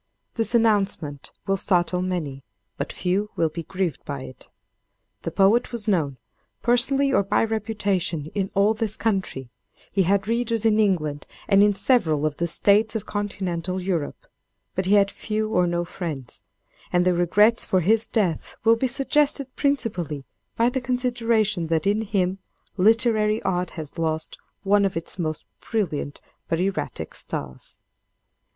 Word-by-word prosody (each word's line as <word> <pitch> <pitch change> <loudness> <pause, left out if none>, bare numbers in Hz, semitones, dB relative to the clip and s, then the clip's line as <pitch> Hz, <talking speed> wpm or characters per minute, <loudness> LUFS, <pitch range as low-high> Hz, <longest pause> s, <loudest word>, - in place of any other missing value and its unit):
This 230 +1 -1
announcement 200 -10 +1
will 195 0 +1
startle 180 -1 +2
many, 160 -8 -3 0.3
but - - -4
few 195 +3 -1
will 165 - +1
be 165 +2 -5
grieved 180 0 -3
by 140 -2 -5
it. 130 - -12 0.7
The - - -3
poet 210 +7 +3
was 235 -3 -3
known, 155 -10 +1 0.5
personally 270 +3 +3
or - - +5
by 195 - +1
reputation, 205 -8 -1
in 195 -2 -1
all 200 +2 +4
this 220 -1 -2
country; 190 - -2 0.4
he 195 - +2
had 195 +2 +2
readers 230 -1 0
in 220 -1 +4
England 155 -9 0 0.2
and 200 -1 +5
in 205 0 +4
several 190 - +2
of 150 -1 -1
the 170 - 0
states 210 +6 +3
of 220 - -3
Continental 190 -3 -3
Europe; 180 -5 -3 0.5
but 185 0 -2
he 200 - +5
had 200 -1 +4
few 215 0 -3
or 180 -3 +3
no 175 0 -1
friends; 155 -9 -6 0.5
and 180 0 +3
the 180 - +4
regrets 210 +7 +3
for 185 - +1
his 220 +6 +3
death 190 -8 -1
will 225 +1 +6
be 260 - +1
suggested 275 +1 0
principally 180 - -1 0.3
by 230 - +3
the 260 +1 -2
consideration 235 -7 +1
that 160 -1 0
in 205 +2 +2
him 195 -3 -1 0.4
literary 215 +1 +3
art 180 -1 0
has 155 +1 -7
lost 160 -1 -2 0.2
one 200 +1 +4
of 195 -3 0
its 165 +3 -6
most 155 -2 -3
brilliant 155 -10 -3 0.3
but 165 - 0
erratic 190 +1 -2
stars. 65 -2 -6
195 Hz, 155 wpm, -24 LUFS, 170-220 Hz, 0.7 s, will